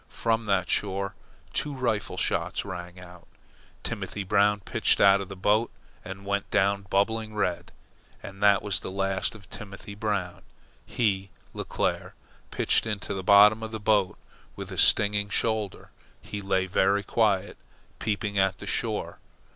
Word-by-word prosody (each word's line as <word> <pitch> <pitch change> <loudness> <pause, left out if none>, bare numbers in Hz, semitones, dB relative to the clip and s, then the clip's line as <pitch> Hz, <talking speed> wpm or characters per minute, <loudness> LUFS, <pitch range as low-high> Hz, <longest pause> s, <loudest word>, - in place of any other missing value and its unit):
From 115 -1 -1
that 95 -2 +1
shore 100 0 -1 0.4
two 145 -2 -1
rifle 115 -6 -1
shots - - -1
rang 90 -2 -7
out. 90 -1 -14 0.6
Timothy 100 - -4
Brown 105 +2 +2
pitched - - +1
out 100 0 +6
of 100 - -7
the 100 - -7
boat 105 +5 +2 0.3
and 95 +1 -8
went 100 0 -2
down 100 0 +1
bubbling 110 +2 0
red, 90 -4 -2 0.5
and 95 0 -10
that 100 -1 +5
was 100 -2 0
the - - -6
last 95 +2 -1
of 100 -4 -14
Timothy 100 0 -9
Brown. 100 -4 -3 0.5
He, 95 -4 0 0.2
Leclere, - - -2 0.4
pitched - - +2
into 105 -3 -3
the 95 - -3
bottom 105 +3 +6
of 110 - -4
the 110 0 -6
boat 105 -3 +2 0.4
with - - -7
a - - -7
stinging 105 0 +4
shoulder. 110 -2 -2 0.3
He 105 - -7
lay 95 -1 +1
very 100 +2 +2
quiet, 100 -2 +1 0.4
peeping 105 -2 -1
at 95 -1 +2
the - - -9
shore. - - -2
100 Hz, 150 wpm, -27 LUFS, 95-105 Hz, 0.6 s, out